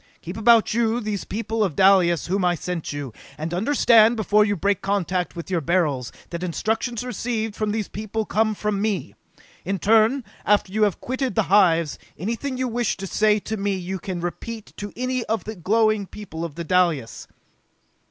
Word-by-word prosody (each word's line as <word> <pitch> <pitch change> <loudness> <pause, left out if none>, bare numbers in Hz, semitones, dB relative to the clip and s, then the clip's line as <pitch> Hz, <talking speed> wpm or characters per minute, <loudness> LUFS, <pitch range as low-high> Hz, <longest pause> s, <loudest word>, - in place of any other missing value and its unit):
Keep 175 +3 -6
about 225 0 +4
you 230 0 +1
those 210 -4 -3
people 225 +1 -2
of 180 -8 -1
Dalis 185 -4 +4
whom 190 +2 0
I 175 -1 +3
sent 175 0 -4
you, 145 -5 -5 0.2
and 160 +2 -4
understand 230 +2 +4
before 210 -1 +3
you 205 -1 0
break 200 +1 0
contact 185 -3 -1
with 170 +2 -7
your 175 -3 +1
Beryls, 150 -7 0 0.2
that 170 0 -4
instructions 220 +6 -2
received 225 -2 -3
from 215 -1 -1
these 215 -1 -2
people 215 +1 -4
come 215 0 +1
from 210 -1 -2
me! 205 -8 -2 0.5
In 195 +2 -2
turn, 225 - +3 0.2
after 200 -2 +2
you 215 - 0
have 200 - -2
quitted 260 +1 -2
the 220 - +3
hives, 170 -6 +4 0.2
anything 235 - -3
you 255 0 -1
wish 240 -1 -1
to 195 - -5
say 210 +2 +2
to 220 +2 -4
me 200 0 -1
you 185 +1 -4
can 185 -2 -5
repeat 215 +5 -6
to 205 0 -6
any 255 +1 -2
one 240 - -2
of 225 0 0
the 220 - -6
glowing 215 +2 +1
people 175 -6 -8
of 165 -4 -5
Dalis!" 170 -7 0
205 Hz, 185 wpm, -23 LUFS, 180-220 Hz, 0.5 s, about